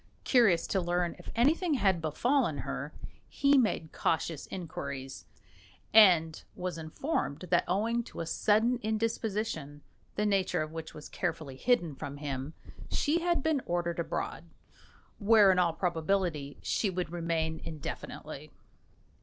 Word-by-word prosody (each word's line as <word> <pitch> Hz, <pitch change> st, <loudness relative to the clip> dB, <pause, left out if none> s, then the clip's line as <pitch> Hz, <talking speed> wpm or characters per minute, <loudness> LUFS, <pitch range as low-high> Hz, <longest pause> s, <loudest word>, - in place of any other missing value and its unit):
Curious 215 Hz, -10 st, +4 dB
to 190 Hz, -, 0 dB
learn 175 Hz, 0 st, 0 dB
if -, -, -11 dB
anything 305 Hz, +7 st, +3 dB
had 195 Hz, -8 st, +2 dB
befallen 245 Hz, -, +1 dB
her, -, -, -4 dB, 0.4 s
he 280 Hz, 0 st, +3 dB
made 215 Hz, -, +1 dB
cautious 160 Hz, -2 st, -1 dB
inquiries, 140 Hz, -7 st, -6 dB, 0.7 s
and 175 Hz, -7 st, +6 dB
was 180 Hz, -2 st, -4 dB
informed 155 Hz, -, -2 dB
that 175 Hz, -, +4 dB
owing 220 Hz, +6 st, +1 dB
to -, -, -10 dB
a 165 Hz, -, -2 dB
sudden 220 Hz, +8 st, +2 dB
indisposition 215 Hz, -9 st, -2 dB, 0.3 s
the 210 Hz, -, 0 dB
nature 195 Hz, -6 st, +1 dB
of 155 Hz, -, -7 dB
which 160 Hz, -1 st, -7 dB
was 150 Hz, -, -9 dB
carefully 160 Hz, -6 st, -3 dB
hidden 175 Hz, -, +1 dB
from 140 Hz, +1 st, -7 dB
him 140 Hz, 0 st, -5 dB, 0.3 s
she 310 Hz, +3 st, +1 dB
had 345 Hz, -4 st, +1 dB
been 315 Hz, -4 st, +1 dB
ordered 170 Hz, -1 st, -1 dB
abroad, 390 Hz, -, -3 dB, 0.7 s
where, 210 Hz, -2 st, +6 dB
in 185 Hz, -, +2 dB
all 170 Hz, -2 st, +3 dB
probability, 165 Hz, -3 st, -1 dB
she 210 Hz, -, 0 dB
would 180 Hz, -3 st, -3 dB
remain 165 Hz, -2 st, -1 dB
indefinitely. 155 Hz, -3 st, -7 dB
180 Hz, 135 wpm, -30 LUFS, 160-225 Hz, 0.7 s, and